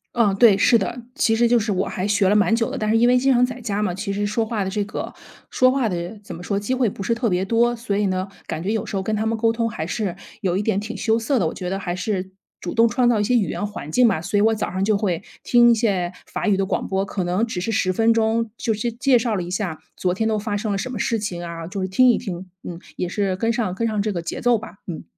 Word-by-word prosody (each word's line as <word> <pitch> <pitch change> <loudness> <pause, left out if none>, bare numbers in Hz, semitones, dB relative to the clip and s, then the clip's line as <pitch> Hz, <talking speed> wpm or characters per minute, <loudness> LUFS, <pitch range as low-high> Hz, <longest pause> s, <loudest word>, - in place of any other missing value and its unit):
嗯， 215 -5 +3
对， 210 0 +6
是 215 +4 +5
的， 240 +4 -3
其 225 - +2
实 235 +1 +3
就 240 +1 +4
是 220 -1 0
我 190 -1 0
还 185 +2 -3
学 200 -2 +3
了 205 - +3
蛮 210 +2 +4
久 230 +2 0
的， 275 - -4
但 215 - -2
是 215 - +2
因 235 +1 +4
为 250 +1 +5
经 265 +1 +3
常 245 0 +4
在 250 0 -1
家 210 -4 -2
嘛， 185 -4 -1
其 200 +1 -3
实 205 +1 -1
说 220 +2 0
话 215 -2 -2
的 190 - -2
这 205 +1 -1
个 205 - -5 0.4
说 255 0 +4
话 260 -4 +1
的 175 +3 -4
怎 - - -8
么 175 - -9
说？ 200 +2 -1
机 210 +6 -1
会 255 -2 +2
不 200 - -5
是 230 +4 0
特 235 0 0
别 180 +1 +1
多， 235 +4 +2
所 230 -4 -2
以 205 - +1
呢， 185 0 -1 0.2
感 155 - -4
觉 190 +5 -1
有 220 - -1
时 - - -5
候 195 - 0
跟 215 +3 -1
他 215 +1 -1
们 225 +1 0
沟 225 0 +2
通 230 0 -1
还 160 -8 -4
是 190 -1 -2 0.3
有 185 -4 0
一 195 - +1
点 210 -2 0
挺 215 +3 -6
羞 225 -1 +1
涩 240 +3 0
的。 175 - +1
我 - - -3
觉 180 - -5
得 195 +2 -2
还 175 -2 -3
是 185 0 -2 0.3
主 175 - -5
动 230 0 +5
创 240 +2 +2
造 230 -3 +2
一 - - +2
些 250 +4 +2
语 220 -5 +2
言 205 - -2
环 205 -7 -7
境 245 +7 +5
吧， 195 -8 +1
所 195 +4 -1
以 - - +4
我 220 +1 +4
早 215 - -2
上 185 +1 -3
儿 - - +2
就 210 +1 +2
会 190 -5 -1 0.2
听 240 -1 +5
一 - - +6
些 200 -6 0 0.2
法 - - -2
语 205 - +4
的 195 - +1
广 - - -1
播， 190 0 0
可 195 -1 -3
能 180 +6 0
只 210 -6 -4
是 185 +6 -2
10 185 -3 +1
分 225 +4 +3
钟， 225 0 +1
就 230 - -2
是 235 +3 -2
介 250 +2 +3
绍 230 -1 -1
了 190 - -1
一 175 - -6
下 180 -4 -3 0.2
昨 180 -1 0
天 220 +4 -1
都 215 - +1
发 210 0 -2
生 210 +1 -2
了 200 - 0
什 255 +6 -4
么 235 - -5
事 230 - 0
情 185 -5 -4
啊， 170 -1 -6
就 190 +3 -5
是 185 - -1
听 220 +8 +4
一 - - 0
听， 185 -4 -7
嗯， 170 -1 -7 0.2
也 180 - -2
是 195 -1 -1
跟 225 +4 0
上 230 -6 -1
跟 230 +5 -1
上 215 -2 -1
这 205 +1 0
个 170 - -3
节 165 - -5
奏 240 -2 +3
吧， 220 - -10
嗯。 170 -4 -6
210 Hz, 335 characters per minute, -22 LUFS, 190-230 Hz, 0.4 s, 对